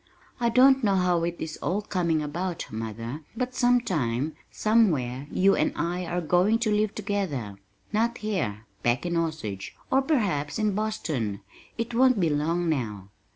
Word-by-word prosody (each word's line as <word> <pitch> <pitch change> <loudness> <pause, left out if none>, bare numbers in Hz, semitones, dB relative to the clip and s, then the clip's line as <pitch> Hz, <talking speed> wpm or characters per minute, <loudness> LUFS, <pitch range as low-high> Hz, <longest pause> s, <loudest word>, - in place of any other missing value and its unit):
"I 235 -1 +2
don't 265 +2 +5
know 200 -2 +3
how 180 -2 +2
it 170 0 -2
is 160 -1 -5
all 200 +4 -1
coming 170 -6 0
about, 170 +4 -3
mother, 115 +5 -5 0.2
but 250 +1 -2
sometime, 160 - +1 0.2
somewhere 150 - +1
you 195 +1 +4
and - - +1
I 175 +1 -2
are 175 +1 -1
going 180 +7 +3
to 215 - +2
live 210 0 +1
together, 175 - -3 0.3
not 230 +2 +1
here, 145 - -2 0.2
back 120 +4 +1
in 175 -1 -1
Osage, 110 - -3 0.2
or 270 - +5
perhaps 205 - 0
in 215 -2 +1
Boston. 155 - -2 0.4
It 230 +1 -3
won't 255 -1 +4
be 165 -4 +2
long 165 +4 0
now." 105 - -2
175 Hz, 155 wpm, -26 LUFS, 140-215 Hz, 0.4 s, don't